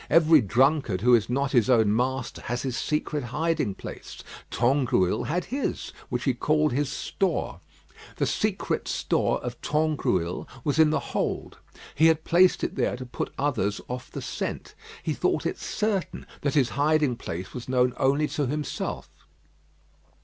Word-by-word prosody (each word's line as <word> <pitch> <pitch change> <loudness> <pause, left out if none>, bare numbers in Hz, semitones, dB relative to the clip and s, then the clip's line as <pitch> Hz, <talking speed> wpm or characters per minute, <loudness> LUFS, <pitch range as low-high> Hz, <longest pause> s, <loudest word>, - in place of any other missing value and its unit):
Every 160 -2 +6
drunkard 125 -2 +2
who 125 +2 +5
is 115 -2 +4
not 135 +2 0
his 120 -3 +3
own 110 -4 +4
master 130 +1 -1
has 120 +1 -2
his 130 -3 -2
secret 150 -2 -1
hiding 150 - -1
place. - - -9 0.3
Tangrouille 120 -7 +2
had 175 +5 -1
his, 275 0 -2 0.2
which 125 0 -2
he 135 - +2
called 150 +4 +1
his 140 +1 0
store. 190 -4 -2 0.6
The - - 0
secret - - -1
store - - +1
of - - -6
Tangrouille 145 - 0 0.2
was 145 +1 0
in 160 -1 +7
the 155 - +1
hold. - - -2 0.3
He 160 +3 +5
had 160 -1 +3
placed 180 +2 +4
it - - -1
there - - 0
to 130 - -7
put 120 - -4
others 120 -8 0
off 125 0 -6
the - - -6
scent. - - -4 0.3
He - - -1
thought - - 0
it - - -2
certain 210 -4 -2 0.2
that 140 0 -1
his 135 -5 +3
hiding 150 -2 +2
place 90 -6 -6
was 125 0 -7
known 125 -1 +2
only 140 +2 +2
to 145 -3 -1
himself. 150 +3 -3
135 Hz, 160 wpm, -26 LUFS, 120-155 Hz, 0.6 s, in